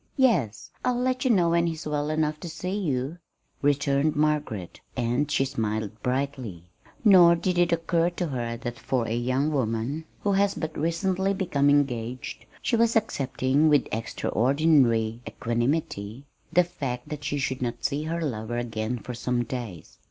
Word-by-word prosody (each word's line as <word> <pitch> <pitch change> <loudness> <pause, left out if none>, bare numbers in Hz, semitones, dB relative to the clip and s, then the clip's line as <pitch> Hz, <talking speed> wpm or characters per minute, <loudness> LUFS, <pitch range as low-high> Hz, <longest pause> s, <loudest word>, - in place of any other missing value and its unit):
"Yes. 170 - +2
I'll 245 -1 +1
let 255 +2 0
you - - +3
know 180 -7 +4
when 170 0 +3
he's 160 -1 -4
well 150 0 -1
enough 155 -1 0
to 170 - -6
see 180 +4 -4
you," 150 -4 -2 0.4
returned 145 +1 +2
Margaret; 150 - -1 0.2
and 125 +5 0
she 135 - +2
smiled 110 -4 -3
brightly. 125 -8 -2 0.4
Nor 180 -4 +8
did 180 +1 0
it 175 -1 +3
occur 170 0 +2
to 175 0 -3
her 120 -3 -3
that 120 0 -6
for 120 0 -1
a 110 - -1
young 130 +5 0
woman 130 +3 -1 0.2
who 205 - +1
has 200 0 +2
but 160 -1 -4
recently 190 +5 0
become 150 -7 +1
engaged, 125 -4 0 0.2
she 240 - +2
was 230 0 +3
accepting 135 - +2
with 145 -3 +4
extraordinary 120 0 +2
equanimity 120 -1 -2 0.3
the 180 +2 +5
fact 135 -8 -5
that 150 -1 -6
she 145 0 -1
should 130 -2 -2
not 120 -1 -3
see 145 +2 0
her 165 +1 -2
lover 120 -3 -3
again 115 0 -2
for 125 +2 -7
some 120 0 -1
days. 115 - -7
140 Hz, 160 wpm, -26 LUFS, 120-165 Hz, 0.4 s, Nor